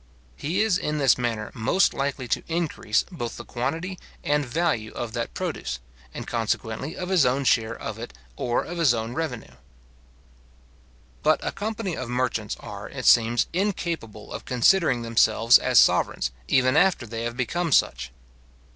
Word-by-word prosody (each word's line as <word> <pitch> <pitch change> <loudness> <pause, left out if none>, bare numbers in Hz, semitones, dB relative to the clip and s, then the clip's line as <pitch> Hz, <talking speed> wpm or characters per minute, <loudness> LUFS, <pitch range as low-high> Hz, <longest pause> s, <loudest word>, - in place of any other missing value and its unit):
He 170 - -1
is 210 -5 +2
in 150 0 -2
this 135 -3 +4
manner 115 -3 -3
most 115 - +2
likely 135 -2 -2
to - - +1
increase 160 -10 0
both 120 -10 -5
the 120 - -8
quantity 165 +9 -3 0.2
and 145 0 +1
value 125 -5 -1
of 115 -2 -5
that 115 -1 -4
produce, 65 - -3 0.3
and - - -7
consequently 115 +4 -2
of 180 0 -4
his 185 -5 +4
own 130 +2 +2
share 115 -3 +1
of - - -6
it, - - -7 0.2
or 120 - 0
of 175 0 -6
his 145 -8 +4
own 115 +1 -3
revenue. 125 - -4 1.7
But - - +3
a - - -1
company 210 -4 -3
of 130 -2 -5
merchants, 125 0 -1
are, - - -8
it - - -6
seems, 120 0 +5
incapable 170 - -3
of - - -6
considering 125 0 +3
themselves 115 0 +5
as - - +1
sovereigns, - - +4 0.2
even 130 +1 +3
after 180 -6 +3
they 115 0 -5
have 120 +1 -4
become 165 +6 -1
such. 65 - +2
125 Hz, 160 wpm, -25 LUFS, 115-165 Hz, 1.7 s, seems